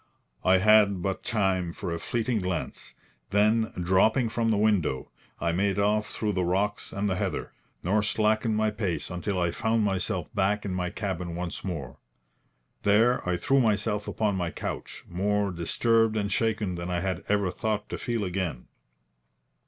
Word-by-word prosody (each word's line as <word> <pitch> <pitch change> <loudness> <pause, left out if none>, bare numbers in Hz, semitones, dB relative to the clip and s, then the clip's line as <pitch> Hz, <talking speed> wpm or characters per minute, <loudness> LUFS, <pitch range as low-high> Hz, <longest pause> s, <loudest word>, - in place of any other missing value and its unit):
I 95 0 +5
had 100 -2 +5
but 95 -1 -2
time 95 -6 0
for 95 -3 -5
a 85 - -2
fleeting 115 +2 -1
glance; 90 -2 -4 0.3
then, 110 +2 +3
dropping 105 +7 +3
from 115 0 0
the 110 - +2
window, 100 -11 +1 0.3
I 85 - 0
made 95 +3 +1
off 105 +1 +2
through 105 -1 -2
the 90 -1 0
rocks 100 +4 0
and 100 +1 -1
the 95 -2 0
heather, - - -2 0.3
nor 100 +4 +2
slackened 110 +1 +1
my 110 0 +2
pace 100 -6 -2
until 90 +2 -2
I 85 -1 +1
found 110 +3 +1
myself 95 -3 -1
back 105 +1 +1
in 95 - -2
my 90 -1 -1
cabin 90 -4 -4
once 85 -1 -4
more. 80 -9 -5 0.8
There 115 +5 +4
I 90 - +1
threw 135 +9 +2
myself 105 -3 +1
upon 105 -3 0
my 90 -2 -1
couch, - - -6
more 100 +2 0
disturbed 115 +6 +2
and 100 -1 -1
shaken 110 -4 0
than 85 0 -5
I 90 -1 -1
had 95 -1 -2
ever 100 -3 +2
thought 105 0 -2
to - - -4
feel 115 -3 -1
again. 90 -8 -3
100 Hz, 170 wpm, -27 LUFS, 90-110 Hz, 0.8 s, I